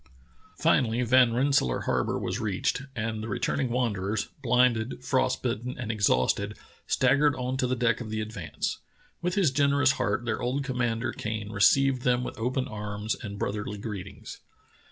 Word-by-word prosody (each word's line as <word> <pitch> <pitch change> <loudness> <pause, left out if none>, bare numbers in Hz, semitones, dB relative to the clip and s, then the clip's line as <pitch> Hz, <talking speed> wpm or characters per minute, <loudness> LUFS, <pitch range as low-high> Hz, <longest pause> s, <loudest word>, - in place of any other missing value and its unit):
Finally 120 -1 +2
Van 125 0 +5
Rensselaer 125 - +2
Harbor - - 0
was - - -3
reached, 105 +4 -1
and 110 -1 -2
the 110 - -5
returning 125 +4 -1
wanderers, 110 -4 -1
blinded, 125 -1 +2
frost 130 -1 +1
bitten, 120 0 -2
and 115 -3 -3
ex 110 -3 +2
hausted, 65 +1 +1 0.3
staggered 145 -1 +3
on 125 +1 -2
to 130 -1 0
the 130 - 0
deck 120 -1 +1
of 115 - -6
the 110 0 -2
Advance. 100 -9 -4 0.4
With 180 +1 -1
his 190 -9 +3
generous 140 -1 +3
heart 105 0 -1
their 110 -2 -1
old 130 +3 -1
commander 120 -3 -1
Kane 110 -1 -4
received 130 +6 +4
them 125 0 +2
with - - -6
open 125 +3 -1
arms 105 0 -3
and 100 -4 -6
brotherly 105 +1 -3
greetings. 100 -3 -7
120 Hz, 160 wpm, -27 LUFS, 105-130 Hz, 0.4 s, Van